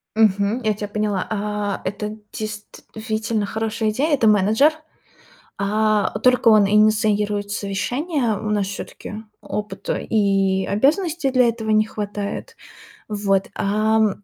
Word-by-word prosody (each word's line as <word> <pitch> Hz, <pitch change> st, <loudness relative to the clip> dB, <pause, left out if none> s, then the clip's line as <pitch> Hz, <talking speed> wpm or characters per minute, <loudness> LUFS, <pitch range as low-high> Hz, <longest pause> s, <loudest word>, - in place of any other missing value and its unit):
Мгм, 210 Hz, +2 st, +2 dB
я 215 Hz, -1 st, +2 dB
тя 205 Hz, 0 st, -5 dB
поняла. 205 Hz, -2 st, -1 dB
А, 210 Hz, -1 st, -2 dB
это 210 Hz, +2 st, -4 dB, 0.2 s
действительно 215 Hz, +1 st, -4 dB
хорошая 220 Hz, +1 st, -2 dB
идея. 290 Hz, +8 st, 0 dB
Это 235 Hz, -5 st, +2 dB
менеджер. 215 Hz, +9 st, +4 dB, 0.9 s
А, 215 Hz, +1 st, +1 dB
только 250 Hz, 0 st, +4 dB
он 215 Hz, -2 st, +6 dB
инициирует 210 Hz, -1 st, +2 dB
совещание. 235 Hz, -, -1 dB
У 215 Hz, -, -5 dB
нас 205 Hz, -2 st, +1 dB
всё-таки 205 Hz, +2 st, -7 dB, 0.2 s
опыта 210 Hz, 0 st, -4 dB
и 195 Hz, -3 st, +2 dB
обязанностей 300 Hz, -, +1 dB
для 255 Hz, -2 st, +4 dB
этого 225 Hz, -1 st, -3 dB
не 215 Hz, 0 st, +4 dB
хватает. 205 Hz, -1 st, -5 dB, 0.5 s
Вот. 200 Hz, -2 st, 0 dB
Ам, 215 Hz, +2 st, +2 dB
215 Hz, 120 wpm, -21 LUFS, 205-220 Hz, 0.9 s, он